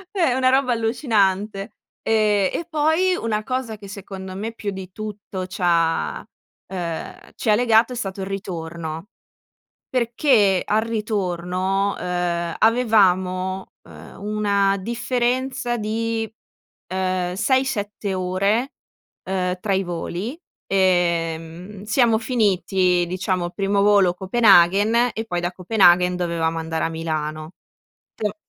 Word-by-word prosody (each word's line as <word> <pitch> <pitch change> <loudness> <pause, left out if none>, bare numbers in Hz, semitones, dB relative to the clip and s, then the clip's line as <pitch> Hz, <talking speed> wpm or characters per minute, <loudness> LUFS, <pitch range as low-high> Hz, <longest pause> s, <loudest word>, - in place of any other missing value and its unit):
Eh, 350 -6 +3
è - - +2
una 255 0 +3
roba 260 -1 +3
allucinante. 210 -3 0 0.3
Ehm, 210 -3 +2
e 340 - -3
poi 320 +4 +2
una 215 -7 -2
cosa 255 -2 -3
che 200 -1 -11
secondo 190 -1 -8
me 220 +4 -4
più 210 -3 -4
di 190 -1 -8
tutto 205 -2 -6
c'ha, 170 -3 0 0.5
uhm, 170 -3 -5
ci - - -2
ha 210 - +6
legato 230 +1 +3
è - - -6
stato 195 -4 -4
il 190 - -4
ritorno. 170 -3 -5 0.8
Perché 235 -5 +3
al 215 +1 +1
ritorno, 195 -3 -1
uhm, 175 -1 -2
avevamo, 190 -5 +2
uhm, - - -13
una 200 -1 +1
differenza 245 +3 -1
di, 225 +1 -2 0.6
uhm, 185 -1 -1
6-7 210 -4 0
ore, 195 +7 0 0.5
uhm, 185 -1 -1
tra 200 - -1
i 190 - +1
voli. 175 - -4 0.3
Ehm, 175 0 0
siamo 225 +1 +3
finiti, 190 -6 +1
diciamo 185 0 -1
il 175 - -9
primo 200 0 +1
volo 200 -3 +5
Copenaghen 205 +3 +4
e 225 - -3
poi 175 -5 -2
da 175 0 -1
Copenaghen 180 -2 +4
dovevamo 165 -2 -1
andare 160 0 -2
a - - 0
Milano. 155 -1 -4 0.6
Pe 210 -1 -2
195 Hz, 120 wpm, -22 LUFS, 180-225 Hz, 0.8 s, ha